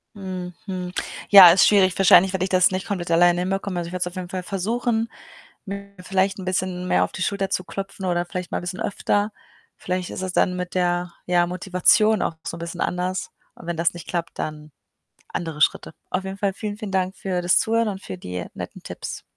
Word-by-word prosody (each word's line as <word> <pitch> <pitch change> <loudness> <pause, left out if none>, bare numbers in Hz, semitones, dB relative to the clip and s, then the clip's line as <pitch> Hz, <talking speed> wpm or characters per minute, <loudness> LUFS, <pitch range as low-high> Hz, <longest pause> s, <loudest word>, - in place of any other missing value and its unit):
Hm, 185 -2 -6
hm. 185 -3 -4 0.4
Ja, 190 -4 +11
ist 180 - +6
schwierig 190 -3 +4
wahrscheinlich 190 0 +6
werde 185 -1 0
ich - - -5
das 185 0 +4
nicht 185 0 -3
komplett 180 -4 -3
alleine 175 +1 +4
hinbekomme. 195 0 -2
Also, 170 -1 -4
ich - - -11
werde 180 - -4
es - - -3
auf 180 - -8
jeden 180 -1 -5
Fall 185 -1 -4
versuchen, 225 +4 -1 0.6
mir 200 0 -7
vielleicht 190 +2 0
‘n 185 - -6
bisschen 185 -1 -2
mehr - - +3
auf - - -3
die 185 - -7
Schulter 195 +1 -1
zu 185 -2 -1
klopfen 195 0 -6
oder 175 -1 +1
vielleicht 180 0 -5
mal - - -2
bisschen 180 +3 -5
öfter. 205 0 0 0.4
Vielleicht 180 0 -3
ist - - -5
es 185 -1 -3
dann 180 +1 +2
mit 180 0 -5
der, 175 -1 0
ja, 175 -1 +3
Motivation 185 +4 +3
auch 165 - -1
so - - -4
‘n - - -10
bisschen 170 +1 -6
anders. 180 +1 -2 0.3
Und 170 - -13
wenn 170 - -2
das 165 +1 +1
nicht 175 -1 -10
klappt, 170 -1 -4
dann 150 0 -5 0.6
andere 160 -3 -5
Schritte. - - +2 0.2
Auf 185 - -1
jeden 190 0 -6
Fall 200 -1 0
vielen, 205 +1 -5
vielen 210 -3 -6
Dank 190 0 0
für 185 -2 -2
das 175 - +4
Zuhören 230 -1 +1
und 195 -2 -4
für 95 - -7
die 90 0 -5
netten - - -7
Tipps. - - -7
185 Hz, 220 wpm, -23 LUFS, 175-195 Hz, 0.6 s, Ja